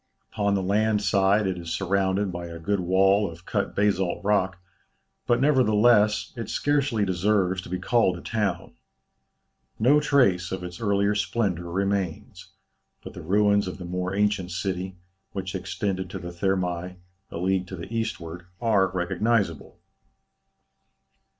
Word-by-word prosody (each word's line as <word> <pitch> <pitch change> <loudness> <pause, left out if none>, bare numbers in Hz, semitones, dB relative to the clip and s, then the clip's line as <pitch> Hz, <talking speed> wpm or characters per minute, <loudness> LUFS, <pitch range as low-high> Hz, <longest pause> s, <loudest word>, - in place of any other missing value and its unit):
Upon 100 -1 +1
the 95 - 0
land 105 +2 +1
side 100 +1 +3
it 95 -2 -2
is 85 -1 -6
surrounded 95 +2 0
by 85 -1 -6
a 85 0 -8
good 100 +5 -1
wall 95 +3 +3
of 85 +2 -13
cut - - -2
basalt 100 -3 +1
rock, 95 -2 +1 0.7
but 120 - +3
nevertheless, 110 -6 +3
it 115 -2 -6
scarcely 140 -7 +1
deserves 95 0 +1
to - - -11
be 90 - -2
called 95 -1 +2
a - - -10
town. 105 -3 -2 1.0
No 135 +7 +4
trace 110 -12 +2
of 95 -1 -4
its 90 +2 -8
earlier 100 -1 +2
splendour 100 -5 -1
remains, 95 -2 -2 0.6
but - - -9
the - - -8
ruins 100 +3 +2
of 90 - -5
the 90 - -8
more 90 +2 -3
ancient 105 -3 +1
city, 90 +1 -3 0.4
which 95 -2 -4
extended 95 0 -3
to 95 - -6
the 90 -2 -7
Thermæ, 90 0 -2 0.3
a - - -7
league 95 +1 0
to 95 - -7
the 85 +6 -8
eastward, 90 -6 -4
are 105 -5 +3
recognizable. 95 -1 -1
95 Hz, 145 wpm, -25 LUFS, 90-105 Hz, 1.0 s, No